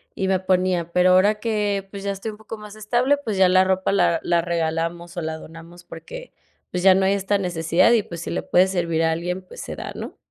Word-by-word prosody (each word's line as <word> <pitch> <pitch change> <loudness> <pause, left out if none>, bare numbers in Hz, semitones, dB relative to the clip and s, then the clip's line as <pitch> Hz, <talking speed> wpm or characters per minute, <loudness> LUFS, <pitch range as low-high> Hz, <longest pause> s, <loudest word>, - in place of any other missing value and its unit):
y 190 - -1
me 190 - +2
ponía, 185 -2 0
pero 180 0 +4
ahora 205 +3 +4
que, 205 -3 -1
pues, 200 -1 -8
ya 200 - -1
estoy 200 +3 -5
un 210 - -12
poco 220 +1 -9
más 210 0 -11
estable 245 +6 +1
pues 220 -9 -4
ya 190 - +5
la 185 0 +5
ropa 190 0 0
la 170 -4 +2
la 170 -1 +2
regalamos 170 +1 -2
o - - -1
la 160 0 -4
donamos 165 +2 -13
porque, - - -10 0.4
pues 180 0 -3
ya 190 -1 +8
no 190 0 +2
hay 195 - +3
esta 200 +1 0
necesidad 170 0 +2
y 225 - +3
pues, 170 -3 -8
si - - -6
le - - -2
puede 185 +1 +3
servir 170 -3 -1
a 160 - +2
alguien, 175 +3 -3
pues, - - -11
se - - -6
da, - - -6
¿no? - - -8
185 Hz, 245 wpm, -22 LUFS, 170-200 Hz, 0.4 s, ya